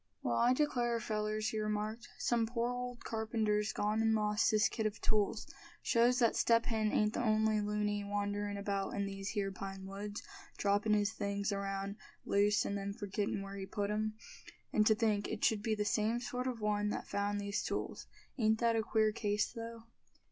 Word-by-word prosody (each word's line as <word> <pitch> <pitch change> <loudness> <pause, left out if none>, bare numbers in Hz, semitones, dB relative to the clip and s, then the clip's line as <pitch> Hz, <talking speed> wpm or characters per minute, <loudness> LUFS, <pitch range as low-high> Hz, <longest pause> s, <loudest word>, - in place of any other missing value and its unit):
"Well, 120 - +1
I 245 +1 +5
declare, 245 -5 +1
fellers," 215 -1 -1
he 220 - -2
remarked, 215 +2 -2
"some 235 -2 +1
poor 235 +1 -1
old 245 -1 -5
carpenter's 220 -1 0
gone 210 +2 0
and 225 0 +3
lost 210 -1 +2
his 215 0 +4
kit 220 -2 -1
of 215 - -6
tools. 210 -2 +1 0.4
Shows 240 +2 +4
that 235 -3 +3
Step 230 0 +4
Hen 220 -2 +1
ain't 210 0 +2
the - - -1
only 215 -2 +3
loony 210 0 -1
wanderin' 205 0 -2
about 200 -1 -2
in 200 0 0
these 195 0 -4
here 200 -2 -1
pine 195 0 -6
woods, 205 +2 -6 0.3
droppin' 205 +1 +2
his 205 +1 +1
things 200 -1 -1
around 195 0 -3 0.3
loose, 205 0 +3
and 200 - -1
then 200 0 -3
forgettin' 200 -1 -2
where 195 0 -7
he 190 -1 -5
put 205 0 -2
'em. 215 0 -1 0.6
And 215 0 +4
to 220 - +6
think 215 -3 +1
it 220 - -1
should 215 -2 +2
be 220 0 0
the 210 -1 -1
same 220 +3 +1
sort 250 +1 -3
of 240 -3 -3
one 210 0 +1
that - - -3
found 205 0 -1
these 200 0 -1
tools. - - -3 0.3
Ain't 220 -1 +4
that 230 0 +2
a 225 - +3
queer 220 -1 +2
case, 210 -1 0
though?" 230 -1 -7
210 Hz, 190 wpm, -34 LUFS, 205-225 Hz, 0.6 s, to